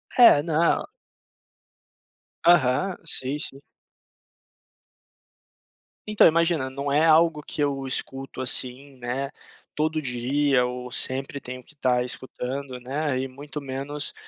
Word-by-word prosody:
É, 235 - +8
não 165 +1 +1 1.6
Aham, 170 +2 +4
sim, 135 -2 -2
sim. 135 - -3 2.5
Então, 210 - +5
imagina, 165 -4 +3
não 140 +2 -4
é 150 +3 +3
algo 160 -1 +5
que 150 - -4
eu 140 -2 0
escuto, 135 0 -4
assim, 130 +2 -2
né, 125 +2 -3 0.5
todo 155 +1 0
dia 130 +1 +1
ou 125 0 -5
sempre 135 +3 -2
tenho 125 0 -7
que 125 - -17
estar 125 -4 +1
escutando, 130 +1 -5
né, 135 +2 -2
e 135 - -2
muito 145 +3 -8
menos, 140 +2 -4
140 Hz, 115 wpm, -25 LUFS, 130-150 Hz, 2.5 s, É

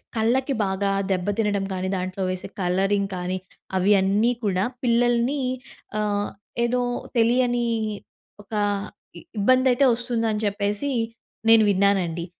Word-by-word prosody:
కళ్ళకి 255 +5 +1
బాగా 195 +1 0 0.2
దెబ్బతినడం 200 +2 0
కానీ, 185 0 -2
దాంట్లో 185 +1 -3
వేసే 185 0 -4
కలరింగ్ 195 +2 +1
కానీ 180 +1 -2 0.4
అవి 190 +2 +3
అన్నీ 205 +5 +2
కూడా 190 -2 +1 0.2
పిల్లల్ని 240 +3 +2 0.6
ఆహ్, 205 -1 0 0.4
ఏదో 250 +1 +1 0.4
తెలియని 240 +1 +2 0.8
ఒక 205 - -15 0.8
ఇబ్బందైతే 255 +4 +4
వస్తుందని 230 -2 -1
చెప్పేసి 205 +6 -1 0.6
నేను 225 -1 +7
విన్నానండి. 190 -4 +1
205 Hz, 100 wpm, -24 LUFS, 190-240 Hz, 0.8 s, నేను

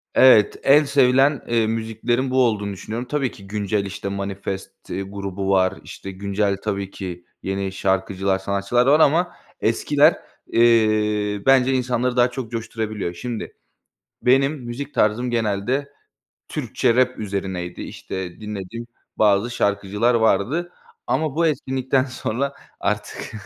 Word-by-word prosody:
evet, 125 -5 +6
en 145 +3 +6
sevilen, 135 0 +3
eee, 115 -2 +2
müziklerin 115 +3 -1
bu 130 -1 +4
olduğunu 105 -3 -1
düşünüyorum. 115 +6 -5
Tabii 135 -3 -1
ki 100 - -14
güncel, 100 0 -1
işte, 100 0 -5
Manifest 100 -1 -4 0.2
grubu 100 0 -4
var, 95 -1 +3
işte, 95 - -8
güncel 100 +1 -1
tabii 100 -2 -2
ki 90 -3 -7 0.2
yeni 95 0 -2
şarkıcılar, 95 0 0
sanatçılar 100 +5 +1
var 145 +3 +6
ama 170 +4 +3 0.3
eskiler, 145 +7 +3 0.3
eee, 105 -3 +3
bence 135 -1 +5
insanları 125 -1 0
daha 125 0 +4
çok 125 -3 -6
coşturabiliyor. 110 -5 -3
Şimdi 115 +5 -6 0.7
benim 135 +4 +4
müzik 135 +4 -6
tarzım 120 +4 +1
genelde 115 +5 -1 0.6
Türkçe 115 - 0
rap 130 0 +2
üzerineydi, 95 -4 -4
işte, 95 0 -7
dinlediğim 105 +2 -6 0.3
bazı 105 +2 +3
şarkıcılar 105 +1 +1
vardı 120 - +1 0.3
ama 155 -3 0
bu 170 0 +3
etkinlikten 130 -3 0
sonra 130 +1 -3 0.3
artık 105 0 -3
110 Hz, 125 wpm, -22 LUFS, 100-130 Hz, 0.7 s, evet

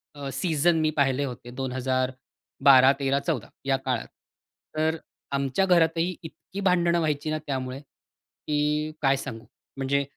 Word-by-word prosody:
अ, 140 -1 -5
season 160 +3 +2
मी 155 0 +2
पाहिले 140 -1 +2
होते 120 -2 -8
2012-2013-2014 130 +1 +1 0.2
या 135 -1 +2
काळात. 130 -3 -2 0.7
तर 160 +1 +1 0.3
आमच्या 140 +6 +1
घरातही 170 0 +3
इतकी 165 +4 -9
भांडणं 175 -2 +3
व्हायची 155 -1 -1
ना 155 - 0
त्यामुळे, 130 -1 -3
की 150 +1 -4
काय 135 -1 +4
सांगू! 115 -3 -7 0.3
म्हणजे 140 +1 +1
140 Hz, 120 wpm, -26 LUFS, 130-155 Hz, 0.7 s, काय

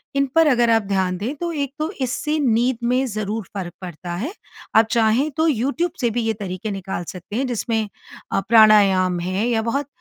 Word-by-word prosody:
इन 275 0 +3
पर 325 -1 +6
अगर 240 -4 +3
आप 225 -1 +4
ध्यान 190 -2 0
दें 220 +9 -3
तो 340 +3 -3
एक 280 -4 -3
तो 310 +1 -1
इससे 280 +4 -1
नींद 245 -2 +2
में 250 +3 +2
ज़रूर 215 -1 -3
फ़र्क 185 -4 -5
पड़ता 175 -1 -7
है। 255 - -4 0.4
आप 220 +1 +7
चाहें 230 +5 +2
तो 320 +1 +3
यूट्यूब 285 +6 0
से 240 - +2
भी 240 +2 -1
ये 225 0 0
तरीके 200 0 -5
निकाल 190 -2 -4
सकते 180 +3 -8
हैं 265 +3 0
जिसमें, 225 -2 -1 0.4
अ, - - +3
प्राणायाम 200 -5 +5
है 185 +6 -1
या 230 -2 +1
बहुत 270 +6 -2
225 Hz, 200 wpm, -21 LUFS, 195-260 Hz, 0.4 s, आप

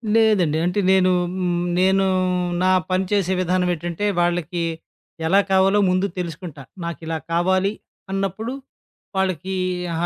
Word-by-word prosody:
లేదండి. 205 -9 +3
అంటే 180 +3 0
నేను 185 -1 +4 0.3
హ్మ్. 175 -1 0
నేను 190 +1 +3 0.6
నా 185 - +4 0.2
పని 185 +1 +2
చేసే 190 -2 +1
విధానం 180 0 +1
ఏటంటే, 175 +4 -4
వాళ్ళకి 175 0 0 0.6
ఎలా 195 +4 +5
కావాలో 190 +2 +4
ముందు 185 +1 +2
తెలుసుకుంటా. 170 -4 -6 0.2
నాకిలా 165 -1 -4
కావాలి 185 +3 +2 0.4
అన్నప్పుడు 195 +5 -2 0.6
వాళ్ళకి 190 -1 -1 0.4
అహా! 165 +1 -1
185 Hz, 120 wpm, -22 LUFS, 175-190 Hz, 0.6 s, ఎలా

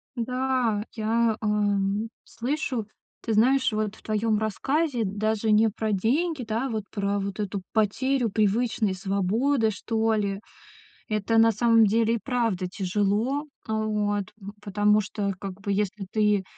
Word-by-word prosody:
Да, 250 -3 0
я, 225 0 +1
эм, 205 0 0 0.2
слышу, 255 -3 -3 0.4
ты 225 - -2
знаешь, 255 +3 +3
вот 215 0 -2
в - - -19
твоём 215 0 0
рассказе 260 +4 0
даже 215 +2 0
не 220 +1 +5
про 215 0 -2
деньги, 270 - 0
да, 230 +4 -2
вот 220 -3 -2
про 200 -1 -1
вот 200 +1 -4
эту 200 -1 -3
потерю 235 +3 +1
привычной 215 0 +1
свободы, 210 +7 +1
что 225 +2 0
ли. 200 -1 -2 0.7
Это 215 +1 +1
на 225 0 +6
самом 230 0 +4
деле 225 +2 +2
и - - 0
правда 230 -8 0
тяжело, 205 +8 0 0.2
э, 220 - -3
вот. 210 -2 -1
В 200 -1 -9
потому 210 +1 +3
что, 205 -1 -2
как 195 0 -7
бы, 200 - -2
если 205 0 -2
ты 210 -2 +2
215 Hz, 145 wpm, -26 LUFS, 205-230 Hz, 0.7 s, на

